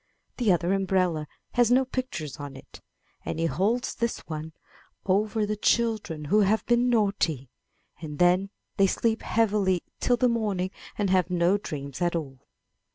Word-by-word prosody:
The 235 -6 +3
other 175 +1 +2
umbrella 185 -5 +1 0.2
has 240 -2 +3
no 260 +2 +4
pictures 250 - -4
on 145 -2 -7
it, - - -13 0.4
and - - -4
he 165 - 0
holds 210 +9 0
this 235 0 -1
one 155 0 -6 0.5
over 210 +2 +1
the 210 +1 -2
children 210 -8 0
who 205 +9 +3
have 210 +2 +2
been 240 +1 +3
naughty, 195 - 0 0.5
and 150 -3 -6
then 180 +3 +3 0.3
they 195 - +5
sleep 225 +3 0
heavily 205 -5 +1 0.2
till 245 - +2
the 250 - +3
morning 205 -6 -1 0.3
and 200 -3 0
have 185 -1 +3
no 180 +1 +3
dreams 140 -6 -6
at 175 0 +1
all. 135 -5 -4
190 Hz, 160 wpm, -26 LUFS, 165-220 Hz, 0.5 s, they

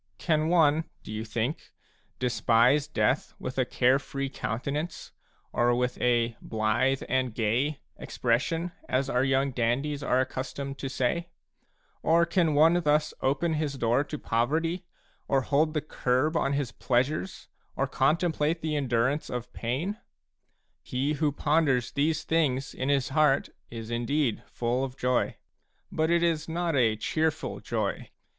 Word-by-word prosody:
Can 155 -2 +1
one, 160 -2 +4 0.2
do - - -9
you 110 +1 -3
think, 115 +6 -3 0.5
despise 125 +3 +3
death 130 -1 0
with 130 +1 -5
a 130 - +3
care 130 +2 +3
free 140 -1 -4
counten 135 +3 -3
ance, 160 +3 -5 0.4
or 120 0 +3
with 125 0 -1
a 120 -1 +2
"blithe 110 +5 0
and 130 -3 0
gay" 125 +7 0 0.2
expression, 160 +9 -1 0.2
as 130 +2 0
our 125 +1 +2
young 135 +1 +2
dandies 130 +5 -1
are 125 - +2
accustomed 135 +1 -4
to 135 - -3
say? 145 +6 -1 0.7
Or 170 +1 +4
can 170 -3 +1
one 165 +4 +5
thus 150 -1 +2
open 145 +5 +1
his 150 -2 -1
door 120 +3 +2
to 150 - -5
poverty, 160 +10 -1 0.4
or 135 -1 +2
hold 155 +4 +1
the 150 - +1
curb 145 +1 0
on 140 -3 +1
his 140 -5 -1
pleasures, 135 - -1 0.3
or 135 - +1
contemplate 155 +3 +1
the 155 -1 -1
endurance 130 +1 0
of 125 0 -5
pain? 145 - -2 0.8
He 135 +4 -1
who 150 0 +1
ponders 145 -4 +1
these 150 +2 0
things 145 -4 0
a - - -10
in 130 - 0
his 140 -2 +2
heart 145 -1 +3 0.2
is 115 -1 -7
indeed 120 +1 0
full 120 +2 -1
of 135 0 -5
joy; 125 0 0 0.5
but 160 0 0
it 170 0 +3
is 165 -2 0
not 170 -1 -1
a 115 -5 +3
cheerful 155 +7 -1
joy. - - -3
140 Hz, 150 wpm, -28 LUFS, 125-155 Hz, 0.8 s, one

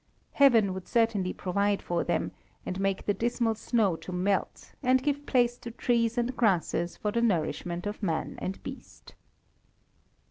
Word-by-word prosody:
Heaven 230 -9 +5
would 190 -1 -7
certainly 225 -6 +1
provide 200 +2 0
for 175 -1 -1
them, 170 -2 -1 0.3
and 185 - -4
make 195 -1 -1
the 205 - +2
dismal 235 0 0
snow 215 -4 +1
to 185 - -9
melt, 190 +2 -1
and 255 -1 +3
give 290 0 -1
place 240 -1 +2
to 240 - -7
trees 235 0 0
and 240 +1 0
grasses 180 -5 +1
for 210 - -2
the 235 - 0
nourishment 175 -3 -1
of 205 +1 -4
man 165 -6 -2
and 190 +1 -4
beast. - - -10
210 Hz, 155 wpm, -28 LUFS, 185-235 Hz, 0.3 s, Heaven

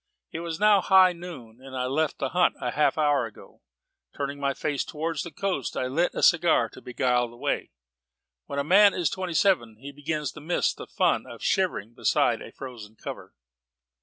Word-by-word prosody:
It 160 - -5
was 170 0 -5
now 210 -1 +5
high 185 0 +6
noon, 140 -10 -10
and 135 -1 -8
I 125 - -1
had 125 - -2
left 155 +1 0
the 135 - -2
hunt 180 +3 +2
half 150 - +1
an 155 - +2
hour 145 -5 +2
ago, 105 - -16 0.6
turned 140 0 -4
my 140 -1 0
face 145 -2 -1
towards 160 0 -3
the 170 - -6
coast, 180 -5 -3
and 130 0 -2
lit 170 +4 +1
a - - -2
cigar - - +4
to - - -14
beguile 125 -1 0
the 120 0 -15
way. - - -2 0.8
When 140 - -5
a 140 - +1
man 200 +6 +6
is 175 -4 0
twenty 185 -3 -4
seven 150 - +2
he 135 +6 -10
begins 150 0 -3
to 150 - -11
miss 170 +4 0
the - - -10
fun - - +1
of - - -10
shivering 180 - 0
beside - - +1
a - - -9
frozen 115 -5 -10
cover. - - -9
145 Hz, 200 wpm, -26 LUFS, 130-175 Hz, 0.8 s, high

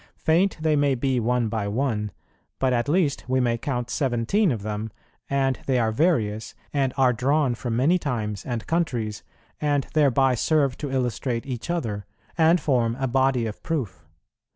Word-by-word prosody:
Faint 175 +5 +2
they 155 -1 +2
may 145 -2 +2
be 130 0 0
one 120 0 +1
by 110 -2 -2
one, 105 -1 -1 0.5
but 130 -1 +1
at 120 +3 0
least 160 -3 +1
we 130 0 +1
may 120 -2 +2
count 120 0 -3
seventeen 135 - +1
of 110 -5 -3
them, 105 +1 -4 0.4
and 135 -1 +1
they 130 -2 +2
are 115 -2 +2
various, 110 -7 0 0.2
and 135 -3 +1
are 130 -2 +4
drawn 135 +2 +1
from 120 -1 -3
many 155 +9 +3
times 110 - -3
and 120 -3 -4
countries, 120 - -1 0.4
and 145 -2 +1
thereby 135 -3 +4
serve 140 +1 +2
to 145 - -5
illustrate 125 -2 -1
each 130 +2 -5
other, 110 - -2 0.3
and 165 +2 +4
form 120 -6 +1
a 135 - 0
body 130 -1 +2
of 105 -1 -6
proof. 125 - -3
130 Hz, 170 wpm, -24 LUFS, 115-145 Hz, 0.5 s, are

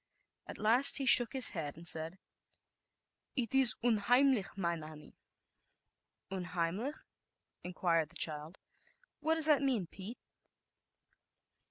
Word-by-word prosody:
At - - -10
last 235 +6 +4
he 275 - -3
shook 240 -1 +7
his 260 -3 +4
head 155 -5 -7
and 170 +1 -9
said, 160 +3 -3 1.2
"It 245 -3 -4
is 260 -5 +5
unheimlich, 245 0 0
mein 170 -3 -4
Annie." 155 -1 -14 1.2
"Unheimlich," 185 - -5 0.6
inquired 170 -3 -2
the 175 - -22
child, 155 +2 -4 0.6
"what 320 +1 -1
does 320 -2 +2
that 300 -2 +2
mean, 255 -9 -2
Pete?" 195 +7 -11
195 Hz, 115 wpm, -31 LUFS, 165-255 Hz, 1.2 s, shook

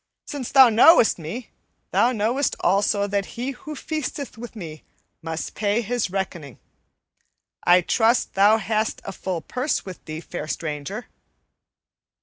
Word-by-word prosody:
Sin' 285 - -6
thou 270 -2 +8
knowest 230 - +6
me, 195 +10 -7 0.4
thou 245 - +3
knowest 240 +5 0
also 200 +2 +2
that 200 -1 -1
he 250 +3 -2
who 300 +3 -9
feasteth 295 -1 -4
with 235 +1 -9
me 160 -7 -8 0.4
must 160 0 -5
pay 210 +2 0
his 235 -2 -1
reckoning. 175 - -4 1.1
I 180 +1 +6
trust 230 +6 +2
thou 205 +3 +5
hast 220 0 -1
a 195 - -4
full 185 -3 -4
purse 255 - -2
with 185 -2 -9
thee, 155 0 -6
fair 165 -2 -7
stranger." 155 - -4
210 Hz, 135 wpm, -23 LUFS, 175-245 Hz, 1.1 s, thou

